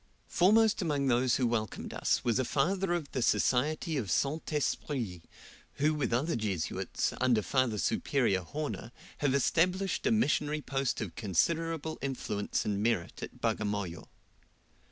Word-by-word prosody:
Foremost 215 +4 +4
among 145 -5 0
those 125 -1 +3
who 130 - +1
welcomed 115 -3 -2
us - - +1
was 120 +1 +2
a - - +2
Father 185 +9 0
of 170 -5 -2
the 130 - -2
Society 150 +7 +1
of 110 -8 -2
St. 140 - 0
Esprit, 130 - -2 0.5
who 150 +2 +1
with 150 -5 -1
other 140 +8 +1
Jesuits, 100 -7 -2
under 120 -4 +3
Father 130 -3 +1
Superior 115 -3 +1
Horner, 145 - -5 0.3
have 140 -2 +2
established 180 +7 +1
a - - +3
missionary 150 -8 +1
post 135 -3 -1
of 95 -6 -4
considerable 160 - -1
influence 125 -7 -2
and 100 -1 -1
merit 110 -6 -1
at - - -8
Bagamoyo. 100 -5 -2
135 Hz, 140 wpm, -31 LUFS, 110-155 Hz, 0.5 s, Foremost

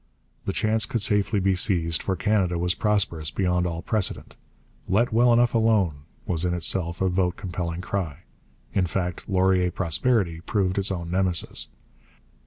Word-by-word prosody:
The - - 0
chance 110 +1 +1
could 115 -4 -1
safely 105 -1 +2
be 95 0 +2
seized, 85 -5 +1
for 95 - -1
Canada 95 -3 +1
was 90 +1 +1
prosperous 95 -8 0
beyond 90 -1 0
all 85 -1 -4
precedent. 110 -4 -2 0.5
'Let 110 +5 +2
well 120 +2 +5
enough 120 0 +4
alone' 100 -11 +2 0.2
was 85 -1 0
in 90 -1 0
itself 85 0 -1
a 95 - +3
vote 90 -1 +1
compelling 85 -2 -4
cry. 90 -5 -4 0.5
In 95 -2 +1
fact, 90 +4 -3
'Laurier 95 -1 +3
prosperity' 90 0 0
proved 95 0 0
its 100 +1 -1
own 85 -2 -4
Nemesis. 95 -2 -1
95 Hz, 155 wpm, -25 LUFS, 85-105 Hz, 0.5 s, well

